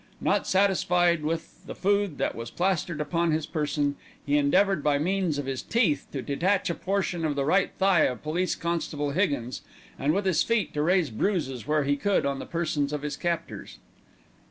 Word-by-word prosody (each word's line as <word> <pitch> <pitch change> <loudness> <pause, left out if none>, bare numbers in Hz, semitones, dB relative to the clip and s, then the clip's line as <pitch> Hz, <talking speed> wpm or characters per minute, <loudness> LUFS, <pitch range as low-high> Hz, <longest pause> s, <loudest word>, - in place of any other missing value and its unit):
Not - - +1
satisfied 180 -3 +3
with 160 +2 -4
the - - -6
food 200 -4 +1
that - - -1
was 115 0 -6
plastered 175 -2 -1
upon 170 +3 0
his 155 -1 0
person, 145 -2 -1 0.3
he 145 - +1
endeavoured 170 +4 +3
by 145 -1 +3
means 180 0 0
of 145 - -3
his 135 -1 -3
teeth 215 - +1
to 135 -3 -4
detach 180 +6 0
a - - -1
portion 185 -2 -2
of 150 -2 0
the 140 -1 0
right 185 +5 +2
thigh 190 -4 +4
of 125 - -3
Police 170 +4 -1
constable 160 -4 -2
Higgins, 140 -8 -1 0.4
and 145 - +2
with 195 +4 0
his 185 -4 +2
feet 230 -3 0
to 150 - -1
raise 170 -3 +2
bruises 135 - -1
where 150 -1 +2
he 145 +1 +1
could 200 +6 +1
on 140 -1 -1
the - - -7
persons 155 -4 -1
of 150 -1 -3
his 150 - -3
captors. 170 -1 -4
160 Hz, 190 wpm, -27 LUFS, 145-185 Hz, 0.4 s, thigh